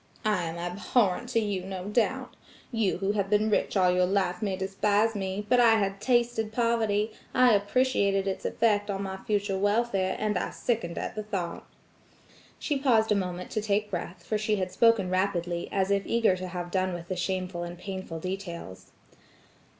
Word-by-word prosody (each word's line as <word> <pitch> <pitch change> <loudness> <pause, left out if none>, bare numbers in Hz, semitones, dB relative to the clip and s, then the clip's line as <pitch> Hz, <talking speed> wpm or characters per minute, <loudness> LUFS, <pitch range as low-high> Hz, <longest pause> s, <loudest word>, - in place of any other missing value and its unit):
I 210 -5 +1
am 165 +1 -5
abhorrent 195 +5 0
to 235 - +2
you, 205 -4 -2
no 190 -1 -6
doubt. 215 +3 0 0.4
You 225 -5 +1
who 195 +2 0
have 200 -2 -1
been 215 +1 +2
rich 205 - +1
all 180 -1 +4
your 180 0 +3
life 190 -2 0
may 200 -3 -1
despise 205 +3 +1
me; 195 0 -3
but 250 +3 +4
I 230 -2 +6
had 195 -2 -1
tasted 240 -3 +1
poverty, 220 -2 +1 0.2
I 250 -2 +6
appreciated 200 -2 +2
its 190 - -3
effect 210 -2 +1
on 195 0 -2
my 190 -1 -4
future 200 -1 -1
welfare, 205 -2 +1
and 210 -3 0
I - - -2
sickened 220 -8 -2
at - - -3
the 215 - -4
thought." 195 -5 -4 0.9
She 290 -3 -1
paused 225 -5 +3
a - - +5
moment 180 -2 -3
to 215 - -1
take 210 0 0
breath, 175 -1 -5
for 210 +5 -1
she 215 0 +1
had 185 -2 -2
spoken 225 -4 +3
rapidly, 180 -2 -1
as 195 0 0
if 200 0 +1
eager 230 -5 +3
to 185 0 -5
have 175 -1 -5
done 185 -1 0
with 170 0 -8
the 185 - -3
shameful 185 -1 -2
and 175 0 -6
painful 190 -3 -6
details. 180 - -6
200 Hz, 185 wpm, -28 LUFS, 185-215 Hz, 0.9 s, I